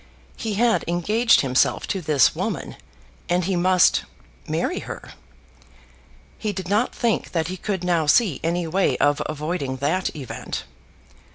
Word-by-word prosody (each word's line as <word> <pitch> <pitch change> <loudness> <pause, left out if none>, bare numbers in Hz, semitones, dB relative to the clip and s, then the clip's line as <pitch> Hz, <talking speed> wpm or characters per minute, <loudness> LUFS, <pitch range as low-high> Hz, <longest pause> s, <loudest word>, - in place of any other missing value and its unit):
He 220 -3 -3
had 230 +2 +2
engaged 210 +8 +3
himself 130 -1 +1
to 190 - -1
this 145 -5 +3
woman, - - -3 0.5
and 175 +1 +2
he 190 +2 0
must 180 +1 +4 0.4
marry - - -1
her. - - -8 1.3
He 215 - -1
did 185 -2 -5
not 210 +6 +1
think 230 -3 -1
that 165 -1 0
he 185 - -3
could 190 -2 -3
now 170 -4 +1
see 180 - +3
any 170 +1 0
way 185 +4 +1
of 145 0 +2
avoiding 150 -3 -3
that 160 +8 -1
event. 135 -5 -6
175 Hz, 145 wpm, -23 LUFS, 155-195 Hz, 1.3 s, must